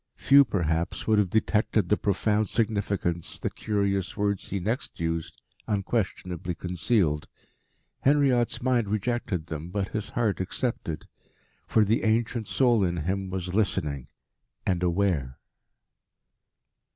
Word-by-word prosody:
Few 140 +1 +6
perhaps 85 - -1
would 110 -1 +4
have 100 -3 +2
detected 110 -1 +1
the 105 - +5
profound 105 +1 +1
significance 100 -6 -1
the - - -3
curious 100 -3 -1
words 100 -1 -1
he 100 - -2
next 110 +8 -3
used 80 -1 -3 0.3
unquestionably 95 -5 -2
concealed. 90 -2 0 0.7
Henriot's 130 -4 +2
mind 125 -4 +2
rejected 110 -4 -1
them, 80 0 -6
but 95 +1 -2
his 110 -1 -4
heart 115 -7 0
accepted. 95 -4 -3 0.6
For 110 -2 +4
the 110 +3 +1
ancient 115 0 +1
soul 120 -6 +3
in 90 -1 0
him 95 +1 -1
was 90 -1 -4
listening 75 - 0 0.6
and 90 -2 +1
aware. 85 -8 0
100 Hz, 120 wpm, -27 LUFS, 90-110 Hz, 0.7 s, Few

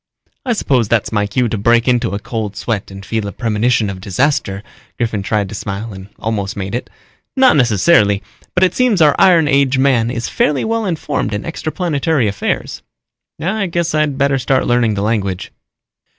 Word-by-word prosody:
"I 245 - +2
suppose 130 - +1
that's 115 -1 0
my 105 -2 0
cue 120 +4 0
to 110 -2 -3
break 115 +3 +3
into 120 -5 +1
a - - -3
cold 110 -2 -4
sweat 105 -1 -3
and 95 0 -10
feel 110 -1 -2
a - - -4
premonition 115 0 0
of 95 -1 -6
disaster." 100 -1 -1 0.3
Griffin 110 -4 -1
tried 105 0 -1
to - - -8
smile 105 +2 -5
and 95 +1 -10
almost 105 -3 -3
made 95 +1 -4
it. 120 - -3 0.5
"Not 260 -6 +5
necessarily, 105 - +3 0.3
but 185 - +3
it 185 - +3
seems 250 -6 +2
our 150 -3 +5
iron 175 -5 +5
age 140 -2 +2
man 130 -4 +2
is 120 -1 -3
fairly 145 -2 0
well 225 -1 -1
informed 150 - -2
in 105 - -4
extraplanetary 160 - -1
affairs." 100 0 -3 0.6
"I 195 +3 -1
guess 170 -1 -1
I'd 155 -3 +1
better 140 -1 +2
start 130 +2 +1
learning 120 -3 +2
the 100 - -2
language." 100 -4 -2
120 Hz, 180 wpm, -16 LUFS, 105-150 Hz, 0.6 s, Not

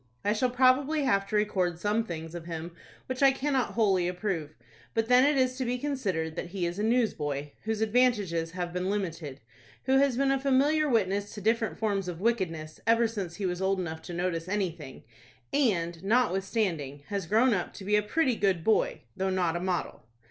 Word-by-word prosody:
I 205 - +3
shall 250 +4 +1
probably 265 +4 +3
have 200 -6 +2
to 215 - -3
record 185 -5 +1
some 210 +5 0
things 165 -5 -6
of 170 -2 -7
him 165 0 -5 0.3
which 255 +1 -4
I 275 -1 +7
cannot 270 -2 -1
wholly 195 -6 +2
approve. 180 -5 -3 0.4
But 225 0 0
then 250 +1 +6
it 290 0 +3
is 255 0 +1
to 260 - -1
be 245 +1 -1
considered 200 - -2
that - - -4
he 180 0 -3
is 175 +3 -3
a - - 0
newsboy, 150 - 0
whose 220 -1 -1
advantages 210 -8 +1
have 175 -1 -4
been 180 +1 -1
limited, 165 -9 -4 0.4
who 265 0 +3
has 275 -3 +2
been 275 0 +2
a 270 - +1
familiar 285 +3 +2
witness 205 -3 0
to 205 - -7
different 225 +2 0
forms 200 -4 -1
of 175 -2 -5
wickedness 180 -8 -1
ever 230 +1 +4
since 195 -7 -5
he 195 - -3
was 180 0 -2
old 190 0 +1
enough 160 -3 -4
to 175 - -8
notice 175 -1 -2
anything, 170 -9 -3 0.5
and, 175 - +1
notwithstanding, 195 - 0
has 200 -4 -3
grown 230 +6 +4
up 180 -3 -2
to 195 - -10
be 210 +1 +2
a 210 - +4
pretty 255 +4 +1
good 190 -6 +1
boy, 220 +3 +2
though 190 0 -1
not 180 -3 0
a - - -1
model. 180 -1 -2
200 Hz, 200 wpm, -28 LUFS, 175-240 Hz, 0.5 s, I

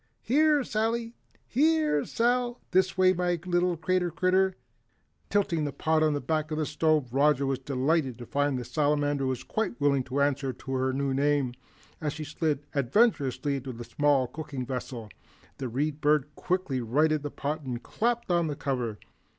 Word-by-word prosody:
Here, 300 +1 +3
Sally, 230 +1 -1 0.3
here 305 - +2
Sal 245 +1 0
this 185 +1 +2
way, 185 0 +5
my 175 -1 0
little 175 -1 +1
crater 180 +1 +1
critter." 185 +2 +2 0.7
Tilting 195 -6 +1
the 145 - -2
pot 155 +3 +1
on 155 -1 +3
the - - -1
back 155 +3 -1
of 155 - -3
the 155 - 0
stove, 150 -4 +1
Roger 140 0 +3
was 135 -1 -1
delighted 135 0 0
to 120 - -8
find 145 +1 0
the 125 - -5
Salamander 145 -2 +1 0.2
quite 220 -7 -2
willing 140 -2 +3
to 130 +2 -2
answer 140 -2 +1
to 135 +2 -9
her 130 0 +1
new 135 0 -1
name. 140 -2 +1 0.5
As 150 -2 -1
she 155 - -6
slid 150 -1 -2
adventurously 140 - +2
into 130 -1 -6
the 120 +1 -7
small 145 +1 +2
cooking 140 -1 -6
vessel, 125 -3 -5 0.5
the 130 -2 -3
Read 145 +5 -2
Bird 150 -1 +2
quickly 180 -8 -1
righted 150 +6 +2
the 145 - -4
pot 150 +3 -3
and 125 -4 -5
clapped 235 -2 -1
on 170 -2 +2
the 150 - -3
cover. 125 -7 -2
150 Hz, 170 wpm, -28 LUFS, 135-180 Hz, 0.7 s, way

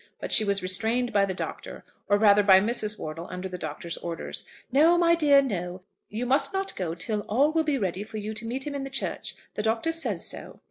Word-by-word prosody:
But - - -6
she - - +5
was 200 -2 0
restrained 225 +7 0
by 200 -1 +4
the 190 - -3
Doctor, - - -7 0.2
or 205 - +4
rather 205 -1 +5
by 195 -2 +7
Mrs. 215 0 0
Wortle 160 +3 -6
under 185 +1 -5
the 180 -1 -7
Doctor's 160 +2 -5
orders. 170 -1 -6 0.3
"No, 315 +6 +5
my 340 -1 +4
dear; 290 -4 +5
no. 180 -6 -4 0.3
You 225 +4 -3
must 265 +3 +2
not 385 0 -1
go 170 -3 -3
till 210 +5 -2
all 275 +8 +3
will 320 0 +1
be 300 -3 0
ready 190 -4 -2
for 215 +1 -7
you 215 +1 -4
to 225 +1 -4
meet 260 +3 -3
him 295 - -4
in 280 -1 -4
the 270 - -5
church. 270 - -3 0.2
The - - -3
Doctor 225 +8 0
says 330 0 -2
so." - - -8
215 Hz, 230 wpm, -26 LUFS, 190-275 Hz, 0.3 s, by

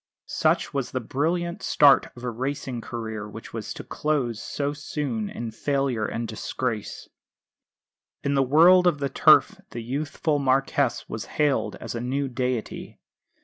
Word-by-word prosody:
Such - - +1
was 140 -3 -1
the 130 - -2
brilliant 170 +8 -1
start 145 -2 +5
of 120 - -12
a 125 - -2
racing 130 0 -4
career 110 -3 -5
which - - -10
was - - -5
to - - -7
close 130 -7 -1
so 145 0 -2
soon 140 -7 -3
in 115 -1 -5
failure 130 -2 -1
and 115 0 -3
disgrace. 110 0 -4 1.2
In 140 - 0
the 135 - +3
world 170 +7 +6
of 170 -4 +3
the 140 -1 -2
Turf - - +5
the 120 - -6
youthful 145 +4 -1
Marquess 135 -1 +1
was 110 - -5
hailed 150 -3 +1
as - - -7
a 115 - -4
new 135 +3 -1
deity. 125 -2 -3
135 Hz, 150 wpm, -25 LUFS, 120-145 Hz, 1.2 s, world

